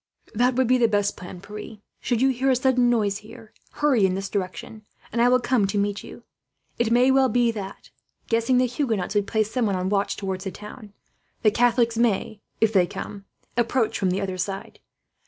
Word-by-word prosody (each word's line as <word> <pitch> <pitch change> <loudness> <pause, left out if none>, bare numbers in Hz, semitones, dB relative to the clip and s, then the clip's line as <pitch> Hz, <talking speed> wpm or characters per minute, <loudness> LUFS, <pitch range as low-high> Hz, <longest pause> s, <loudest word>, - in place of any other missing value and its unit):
"That 245 +3 +2
would 260 0 +3
be 255 +1 +3
the 235 - +4
best 205 -2 0
plan, 180 -1 -10
Pierre. 210 +2 -9 0.2
Should 240 0 0
you 270 - +5
hear 265 +1 0
a 260 - +4
sudden 250 -1 +2
noise 210 -4 +1
here, 220 0 -14 0.2
hurry 280 -8 +2
in 185 - -1
this 195 0 -4
direction, 215 +3 -5 0.3
and 235 - 0
I 245 - +5
will 255 0 +4
come 245 -5 +1
to 200 +1 -2
meet 205 0 -1
you. - - -12 0.6
It 235 -1 +2
may 245 +3 +4
well 265 -1 +4
be 240 +1 +2
that, 200 -3 -8 0.4
guessing 230 +2 +2
the 255 - +4
Huguenots 235 -7 -2
would 205 -1 +1
place 220 -1 0
someone 225 -5 0
on 185 0 -1
watch 200 0 0
towards 190 -1 -4
the - - -1
town, 210 +2 -11 0.5
the 215 - +5
Catholics 235 0 +2
may, 215 -2 0 0.2
if 220 -1 +2
they 185 -3 +4
come, 200 +3 -8 0.3
approach 235 -1 0
from 190 - +1
the 185 +2 -1
other 190 -2 -4
side. 195 +2 -5
220 Hz, 205 wpm, -24 LUFS, 200-245 Hz, 0.6 s, you